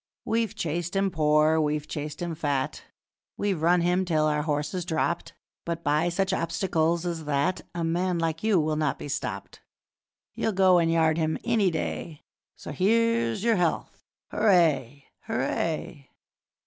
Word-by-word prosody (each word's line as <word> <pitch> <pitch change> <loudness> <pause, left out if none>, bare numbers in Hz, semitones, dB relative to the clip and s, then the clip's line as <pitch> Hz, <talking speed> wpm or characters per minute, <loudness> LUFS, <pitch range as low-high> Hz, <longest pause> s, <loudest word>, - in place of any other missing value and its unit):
'We've 225 -2 0
chased 170 0 -3
him 195 0 +1
poor, 155 0 +3
we've 150 0 -1
chased 150 +2 -5
him 170 -1 -3
fat, 145 -4 -2 0.5
We've 195 -6 -1
run 175 +2 +4
him 180 +2 +2
till 155 -4 +1
our 150 -1 +1
horses 150 +3 -2
dropped, 170 +1 -2 0.3
But 170 0 -4
by 150 +4 +2
such 195 +2 0
obstacles 170 -1 0
as 165 -3 -3
that 150 +5 0
A 170 - -2
man 175 +2 0
like 165 -1 -1
you 215 -5 +3
will 155 0 0
not 150 -3 0
be - - -7
stopped, 145 - -5 0.7
You'll 220 - -1
go 185 -2 +5
and 165 -1 +2
yard 160 -1 +2
him 160 0 0
any 225 -5 +2
day, 160 -1 -4 0.3
So - - -9
here's 230 - +1
your 230 -2 +3
health! 175 -2 -1 0.3
Hooray! 150 - +2 0.2
Hooray!' 140 +2 -2
165 Hz, 150 wpm, -26 LUFS, 150-185 Hz, 0.7 s, go